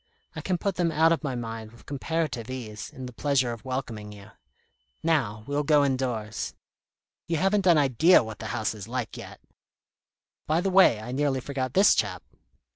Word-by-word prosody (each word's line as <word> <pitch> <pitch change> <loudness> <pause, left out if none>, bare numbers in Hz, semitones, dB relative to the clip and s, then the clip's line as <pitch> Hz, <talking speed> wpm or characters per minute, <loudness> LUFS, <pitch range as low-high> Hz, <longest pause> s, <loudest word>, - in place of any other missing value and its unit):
I - - -5
can 185 -2 -1
put 195 +2 -2
them 170 -2 +1
out 160 +1 +4
of 165 -5 +1
my 135 -3 -2
mind 115 -2 -6
with 115 - -18
comparative 140 -4 -3
ease, 110 -5 -6
in 130 - -9
the 125 - -8
pleasure 130 -2 +1
of 115 - -10
welcoming 125 -5 -5
you. 105 +1 -13 0.7
Now 115 -10 0
we'll 145 +1 -1
go 145 -1 +4
indoors. 125 -6 -2 0.7
You 165 - 0
haven't 195 +3 +2
an 170 -3 +6
idea 145 +4 +5
what 110 -1 -8
the 110 - -5
house 110 +1 -1
is 105 -2 -9
like 125 -2 -4
yet. - - -10 1.1
By 155 +2 +2
the 190 +2 0
way, 185 - +6
I 110 +3 -7
nearly 135 0 0
forgot 130 -1 -4
this 195 +2 +7
chap." 95 -4 -1
130 Hz, 185 wpm, -27 LUFS, 115-155 Hz, 1.1 s, this